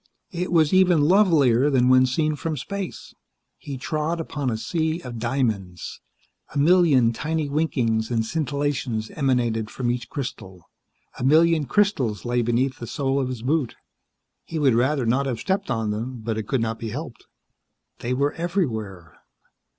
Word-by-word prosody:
It 180 0 -3
was 160 -2 +3
even 185 -4 +5
lovelier 145 - +4
than 125 -3 +3
when 130 0 +5
seen 155 +4 0
from 155 +1 -3
space. 195 - -6 0.5
He 140 -2 -6
trod 155 +5 -2
upon 145 -4 -3
a 110 - -1
sea 160 +6 -1
of 120 -6 -7
diamonds. 110 -7 -2 0.5
A - - -1
million 145 -7 +4
tiny 155 +4 -2
winkings 125 -7 0
and 115 -2 0
scintillations 140 -5 -2
emanated 120 -6 0
from 120 0 -2
each 120 -1 -4
crystal. 95 - -7 0.5
A - - -4
million 160 +2 +4
crystals 135 - +1
lay 120 0 +1
beneath 120 +3 0
the 120 - -6
sole 135 +1 -1
of 130 -2 -1
his 125 -3 -6
boot. 140 -1 0 0.7
He 165 - -6
would 140 -5 +3
rather 130 +3 +1
not 130 +4 +1
have 120 -4 -2
stepped 195 - -1
on 115 -3 -1
them, 115 +3 -4
but 115 0 -2
it 110 -1 -4
could 135 -4 0
not 115 0 -2
be 115 - -4
helped. 135 +2 -7 0.7
They 125 +2 -2
were 140 +2 +1
everywhere. 110 - -3
130 Hz, 160 wpm, -24 LUFS, 115-155 Hz, 0.7 s, even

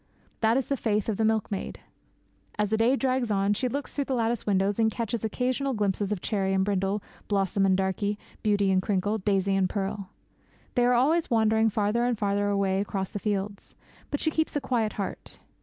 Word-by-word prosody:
That 225 +2 +3
is 270 - 0
the 275 - -1
faith 210 -3 0
of 210 - -1
the 225 - +1
milkmaid. 220 -3 -1 0.8
As 210 -1 0
the 220 - +2
day 235 +4 +4
drags 260 -3 0
on 200 0 +2
she 250 +5 0
looks 280 +3 -4
through 280 - -1
the 265 - -1
lattice 230 -2 -1
window 195 0 +2
and 220 -1 +4
catches 230 0 -3
occasional 255 +4 -1
glimpses 205 -1 0
of 200 -4 -2
Cherry 195 -3 0
and 190 0 +2
Brindle, 195 0 0 0.2
Blossom 195 -1 +1
and 190 -1 +3
Darkie, 195 +2 -1 0.2
Beauty 205 -2 +2
and 185 0 +3
Crinkle, 205 +2 0
Daisy 195 -1 +1
and 190 -1 +2
Pearl. 200 0 -3 0.6
They 245 -1 +3
are 245 0 +4
always 310 +7 +2
wandering 220 -1 +3
farther 215 +2 +1
and 245 -2 +1
farther 205 0 0
away 195 -1 +1
across 195 -2 -3
the 205 - -4
fields; 200 -1 -3 0.3
but 290 - -2
she 315 - 0
keeps 315 0 -1
a - - +2
quiet 240 -5 0
heart. 200 -2 -6
210 Hz, 200 wpm, -27 LUFS, 195-235 Hz, 0.8 s, day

